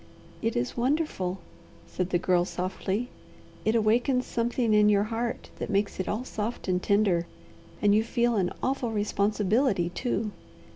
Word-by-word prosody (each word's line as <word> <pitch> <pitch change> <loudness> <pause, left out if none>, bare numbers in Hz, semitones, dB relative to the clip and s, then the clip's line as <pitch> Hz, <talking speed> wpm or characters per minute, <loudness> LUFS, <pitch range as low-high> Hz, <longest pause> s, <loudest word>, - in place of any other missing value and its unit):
"It 225 0 0
is 120 - -1
wonderful," 245 - 0 0.5
said 185 0 -3
the 180 - +2
Girl 175 0 +2
softly. 190 +5 -3 0.5
"It 220 - +2
awakens 240 +4 +2
something 235 -1 0
in 210 0 +6
your 205 -1 +4
heart 230 +2 -3
that - - -4
makes 200 -1 0
it 185 - -2
all 215 +4 -1
soft 220 -3 -4
and 180 -1 +1
tender, 195 -5 +2 0.6
and 205 0 +5
you 215 +1 +4
feel 235 0 +1
an 185 -4 +1
awful 260 -2 0
responsibility, 210 -1 +1
too. 220 0 -2
215 Hz, 150 wpm, -28 LUFS, 190-235 Hz, 0.6 s, in